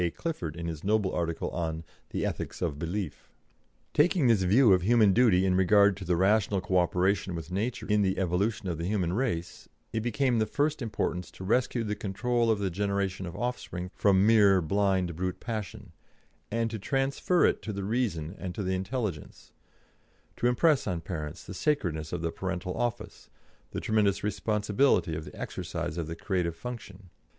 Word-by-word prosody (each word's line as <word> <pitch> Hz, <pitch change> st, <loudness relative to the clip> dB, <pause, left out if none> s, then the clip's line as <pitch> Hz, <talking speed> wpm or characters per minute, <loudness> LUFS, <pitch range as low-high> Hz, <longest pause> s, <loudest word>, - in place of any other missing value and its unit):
Clifford 90 Hz, -, -4 dB
in 85 Hz, 0 st, -5 dB
his 80 Hz, -3 st, -5 dB
noble 105 Hz, -1 st, +1 dB
article 85 Hz, -1 st, -2 dB
on 80 Hz, -2 st, -3 dB, 0.3 s
the -, -, -2 dB
"Ethics -, -, -4 dB
of 70 Hz, -, -2 dB
Belief." 85 Hz, 0 st, -4 dB, 0.6 s
Taking 160 Hz, 0 st, +3 dB
this 115 Hz, -5 st, +4 dB
view 105 Hz, +4 st, +5 dB
of 90 Hz, -, +3 dB
human 110 Hz, 0 st, +4 dB
duty 105 Hz, -6 st, +4 dB
in 95 Hz, -, +2 dB
regard 100 Hz, +2 st, +5 dB
to 95 Hz, -, -7 dB
the 90 Hz, 0 st, +2 dB
rational 100 Hz, +2 st, +2 dB
co 95 Hz, 0 st, +1 dB
operation 90 Hz, +1 st, +1 dB
with 80 Hz, +1 st, -7 dB
nature 110 Hz, +6 st, -2 dB
in 105 Hz, -1 st, +2 dB
the 95 Hz, -1 st, +1 dB
evolution 95 Hz, +3 st, 0 dB
of 85 Hz, -3 st, -3 dB
the 85 Hz, -, -2 dB
human 95 Hz, -4 st, 0 dB
race, 100 Hz, -8 st, -3 dB, 0.2 s
it 110 Hz, -, 0 dB
became 120 Hz, +2 st, +1 dB
of -, -, +2 dB
the 110 Hz, -, +2 dB
first 145 Hz, +5 st, 0 dB
importance 105 Hz, -5 st, -2 dB
to -, -, -11 dB
rescue 120 Hz, +3 st, +1 dB
the 105 Hz, -1 st, -2 dB
control 115 Hz, +4 st, 0 dB
of 110 Hz, -, +3 dB
the 100 Hz, -2 st, -1 dB
generation 100 Hz, 0 st, -1 dB
of 85 Hz, -, -7 dB
offspring 90 Hz, -7 st, -4 dB
from 100 Hz, -1 st, +3 dB
mere 105 Hz, -4 st, +6 dB
blind 95 Hz, 0 st, +1 dB
brute 90 Hz, +2 st, -3 dB
passion, 110 Hz, -5 st, -6 dB, 0.6 s
and 115 Hz, 0 st, -1 dB
to 110 Hz, -, -4 dB
transfer 135 Hz, -, +1 dB
it -, -, +1 dB
to 110 Hz, -, -4 dB
the 100 Hz, -1 st, -4 dB
reason 95 Hz, -8 st, -1 dB
and 90 Hz, -2 st, -5 dB
to 105 Hz, -, -3 dB
the 95 Hz, 0 st, -1 dB
intelligence; 95 Hz, -, -4 dB, 0.8 s
to 120 Hz, -, +1 dB
impress 145 Hz, +4 st, +3 dB
on 85 Hz, -2 st, -2 dB
parents 75 Hz, -3 st, -6 dB
the -, -, -8 dB
sacredness 80 Hz, -, -1 dB
of 85 Hz, -1 st, -3 dB
the 85 Hz, -, 0 dB
parental 90 Hz, 0 st, -4 dB
office, 120 Hz, -2 st, -4 dB, 0.4 s
the -, -, -4 dB
tremendous 105 Hz, -3 st, +1 dB
responsibility 105 Hz, -, +1 dB
of 75 Hz, 0 st, -5 dB
the 75 Hz, -, -11 dB
exercise -, -, -4 dB
of 85 Hz, -3 st, -3 dB
the 80 Hz, -, -5 dB
creative 85 Hz, -2 st, -1 dB
function. 100 Hz, -3 st, -9 dB
100 Hz, 180 wpm, -29 LUFS, 90-110 Hz, 0.8 s, mere